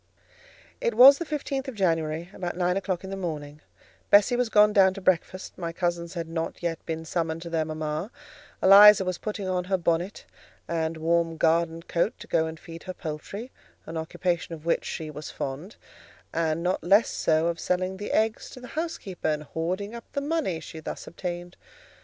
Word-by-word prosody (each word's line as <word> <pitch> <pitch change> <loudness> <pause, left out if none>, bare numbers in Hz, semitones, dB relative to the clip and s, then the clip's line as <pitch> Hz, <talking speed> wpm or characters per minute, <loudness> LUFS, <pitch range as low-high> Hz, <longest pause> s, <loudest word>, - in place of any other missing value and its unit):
It 475 -1 0
was 275 +3 +9
the 340 - -3
fifteenth 280 -3 -3
of 265 - -6
January, 165 -2 0
about 175 -1 -4
nine 180 0 +1
o'clock 190 -2 -2
in 190 - -7
the - - -3
morning: 150 -5 -5 0.5
Bessie 205 +5 +6
was 245 -1 +1
gone 210 -1 +5
down 190 -2 +5
to - - -6
breakfast; 185 0 0
my 170 -2 -3
cousins 170 0 -2
had 165 -1 -3
not 165 +1 -4
yet 165 -2 -2
been 160 0 -4
summoned 165 0 -2
to 170 - -8
their 160 -1 +1
mama; 155 +3 -3 0.5
Eliza 200 +1 +9
was 185 -1 -2
putting 210 -2 -4
on 180 -1 -1
her 190 +1 +1
bonnet 175 +3 -1 0.4
and 160 -1 -1
warm 165 0 +1
garden 165 +1 +1
coat 170 +6 0
to - - -10
go 160 0 +1
and 160 0 -7
feed 165 0 -10
her 185 -1 -6
poultry, 195 +10 -6 0.3
an 165 - -7
occupation 170 +1 -2
of 155 0 -15
which 170 - +1
she 155 -2 -5
was 150 0 -7
fond: 145 +9 -5 0.6
and 165 0 0
not 180 +1 0
less 200 +6 +5
so 160 0 +1
of 170 0 -1
selling 185 +1 -1
the 205 - -5
eggs 220 +1 0
to - - -11
the 250 - -10
housekeeper 305 - -4
and 150 -1 0
hoarding 180 +8 -3
up 235 -1 -8
the - - 0
money 285 - -1
she 160 - -9
thus 155 - -6
obtained. 175 0 -6
175 Hz, 190 wpm, -26 LUFS, 165-195 Hz, 0.6 s, was